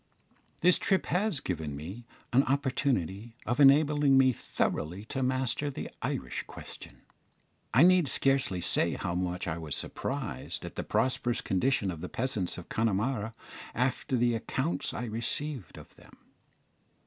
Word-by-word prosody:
This 180 Hz, +1 st, +5 dB
trip 190 Hz, -1 st, +2 dB
has 185 Hz, -3 st, 0 dB
given 80 Hz, -, -3 dB
me 95 Hz, +12 st, -8 dB, 0.3 s
an 130 Hz, -, +7 dB
opportunity 125 Hz, -, 0 dB
of 120 Hz, +4 st, -1 dB
enabling 145 Hz, 0 st, +6 dB
me 130 Hz, -1 st, +5 dB
thoroughly 90 Hz, -2 st, -2 dB
to 130 Hz, +3 st, -3 dB
master 130 Hz, +2 st, 0 dB
the 135 Hz, -, -6 dB
Irish -, -, -2 dB
question. -, -, -10 dB, 0.7 s
I 130 Hz, +8 st, +6 dB
need 180 Hz, -3 st, +6 dB
scarcely 135 Hz, -11 st, +2 dB
say -, -, +2 dB
how 85 Hz, -, -3 dB
much 90 Hz, 0 st, -2 dB
I 85 Hz, 0 st, -2 dB
was 80 Hz, -3 st, -3 dB
surprised -, -, -4 dB
at -, -, -7 dB
the -, -, -3 dB
prosperous 125 Hz, -2 st, 0 dB
condition 100 Hz, 0 st, +1 dB
of 80 Hz, -2 st, -7 dB
the 90 Hz, -, -5 dB
peasants 115 Hz, -8 st, -2 dB
of 90 Hz, -, -9 dB
Connemara 110 Hz, +1 st, 0 dB, 0.4 s
after 125 Hz, +1 st, 0 dB
the 120 Hz, 0 st, +3 dB
accounts 135 Hz, +6 st, -2 dB
I -, -, -4 dB
had 115 Hz, -, -4 dB
received 120 Hz, -, -2 dB
of -, -, -13 dB
them. -, -, -18 dB
120 Hz, 150 wpm, -30 LUFS, 95-135 Hz, 0.7 s, an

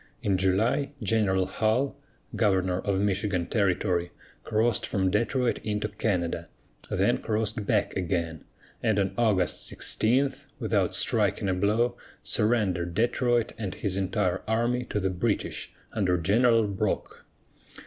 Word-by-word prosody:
In 100 Hz, -2 st, +2 dB
July, 110 Hz, +10 st, +1 dB
General 100 Hz, -3 st, +2 dB
Hull, 110 Hz, +8 st, 0 dB, 0.4 s
governor 95 Hz, -4 st, +2 dB
of 100 Hz, -1 st, -1 dB
Michigan 100 Hz, -2 st, 0 dB
territory, 90 Hz, -3 st, 0 dB, 0.3 s
crossed 110 Hz, 0 st, +1 dB
from 95 Hz, -3 st, 0 dB
Detroit 120 Hz, +4 st, +1 dB
into 105 Hz, 0 st, -2 dB
Canada, 90 Hz, -5 st, -2 dB, 0.4 s
then -, -, +2 dB
crossed 110 Hz, -1 st, -2 dB
back 105 Hz, -3 st, +1 dB
again, 85 Hz, -3 st, -2 dB, 0.4 s
and 110 Hz, -3 st, +1 dB
on 100 Hz, -1 st, +1 dB
August 105 Hz, -6 st, +1 dB
16, 135 Hz, +5 st, +1 dB, 0.2 s
without -, -, 0 dB
striking -, -, +1 dB
a 95 Hz, -, +2 dB
blow, 105 Hz, +6 st, +1 dB, 0.3 s
surrendered 95 Hz, -7 st, +1 dB
Detroit 120 Hz, +1 st, +1 dB
and 100 Hz, -4 st, -4 dB
his 100 Hz, -3 st, -2 dB
entire 95 Hz, -1 st, 0 dB
army 120 Hz, +3 st, 0 dB
to 105 Hz, -, -2 dB
the 95 Hz, -1 st, 0 dB
British 90 Hz, -, -2 dB, 0.2 s
under 95 Hz, -5 st, +1 dB
General 115 Hz, +6 st, +3 dB
Brock. 100 Hz, -2 st, -3 dB
105 Hz, 125 wpm, -27 LUFS, 95-115 Hz, 0.4 s, General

